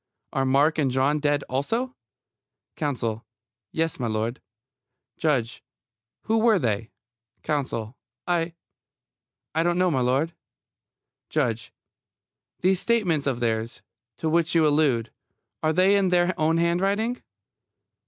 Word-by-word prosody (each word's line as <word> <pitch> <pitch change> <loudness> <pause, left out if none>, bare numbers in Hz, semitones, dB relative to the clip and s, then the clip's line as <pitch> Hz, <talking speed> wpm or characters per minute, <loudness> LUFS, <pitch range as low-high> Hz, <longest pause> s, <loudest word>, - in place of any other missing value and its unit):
Are 135 - +1
Mark 145 +4 +3
and 140 -3 +2
John 135 +4 +2
dead, 145 -1 +1
also? 230 - -2 0.8
COUNSEL: 115 -6 -2 0.5
Yes, 165 0 -1
m'lud. 115 0 -2 0.8
JUDGE: 125 -6 0 0.6
Who 225 +1 +1
were 225 -2 +4
they? 115 - -1 0.5
COUNSEL: 130 -6 -2 0.3
I 170 -1 0 1.0
I 160 - +2
don't 175 +1 +1
know, 180 -1 +3
m'lud. 135 +4 +1 1.0
JUDGE: 120 -7 -1 0.9
These 185 0 +3
statements 185 -12 +1
of 125 -3 -1
theirs, 115 0 -2 0.3
to 160 - -2
which 165 +1 +1
you 160 -2 +5
allude: 145 -6 +2 0.5
are 155 - +2
they 185 +4 +4
in 195 -2 +3
their 180 0 +3
own 160 +1 +2
handwriting? 195 +8 +1
155 Hz, 115 wpm, -25 LUFS, 130-175 Hz, 1.0 s, you